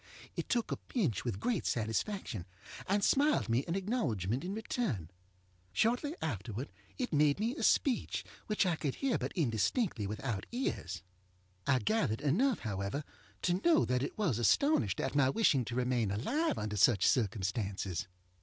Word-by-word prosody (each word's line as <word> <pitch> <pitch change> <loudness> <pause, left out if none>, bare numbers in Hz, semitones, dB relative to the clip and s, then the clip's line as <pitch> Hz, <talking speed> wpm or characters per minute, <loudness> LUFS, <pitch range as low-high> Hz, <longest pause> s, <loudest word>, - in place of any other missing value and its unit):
It - - -4
took 235 -2 0
a - - -1
pinch 165 - -1
with 115 -6 -3
great 230 - 0
satisfaction, 110 - -2 0.4
and 200 +1 +2
smiled 290 - +3
me 120 +4 +2
an 170 - -1
acknowledgement 135 - -1
in 180 - -3
return. 215 - -2 0.6
Shortly 245 - +1
afterward 115 - -4 0.3
it 250 - -2
made 150 +1 +4
me 230 +5 0
a - - -5
speech, 260 -5 +2 0.2
which 210 -2 +2
I 175 -3 +2
could 140 -4 -2
hear 270 -3 0
but - - -3
indistinctly 135 - 0
without 105 0 -3
ears. 235 - -3 0.6
I 130 - +4
gathered 125 - 0
enough, 215 - +2
however, 100 +6 -3 0.4
to 180 +1 +1
know 335 -2 +5
that 125 0 +1
it 140 - -4
was 170 - +1
astonished 120 - +3
at - - -1
my 145 -2 +4
wishing 140 - +3
to 115 - -4
remain 125 -4 +1
alive 280 - 0
under 105 0 -3
such 100 -1 +5
circumstances. 100 - 0
135 Hz, 155 wpm, -33 LUFS, -, 0.6 s, know